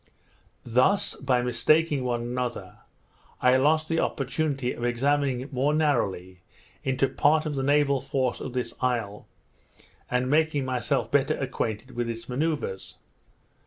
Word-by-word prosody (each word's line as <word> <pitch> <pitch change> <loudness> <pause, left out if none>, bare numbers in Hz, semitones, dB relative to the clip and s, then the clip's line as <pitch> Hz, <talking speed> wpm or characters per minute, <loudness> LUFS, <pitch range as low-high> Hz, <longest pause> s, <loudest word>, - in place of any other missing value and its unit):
Thus, 130 - +3
by 125 -2 +1
mistaking 145 +4 +2
one 120 -1 -1
another, 120 -5 -4 0.6
I 125 0 +4
lost 155 +4 +2
the 165 0 0
opportunity 135 -2 -1
of 120 - -8
examining 135 +1 0
more 140 +3 +1
narrowly 95 - 0 0.4
into 130 +1 +1
part 155 +3 +2
of 155 - -2
the 135 - -2
naval 140 -1 +2
force 130 -2 -1
of 130 - -6
this 125 -1 -2
isle, 115 -5 -2 0.8
and 125 0 0
making 150 -1 +2
myself 125 -3 -1
better - - +2
acquainted 110 +4 -3
with 120 -1 -3
its 115 0 -6
manoeuvres. 135 -7 -3
130 Hz, 130 wpm, -26 LUFS, 120-145 Hz, 0.8 s, I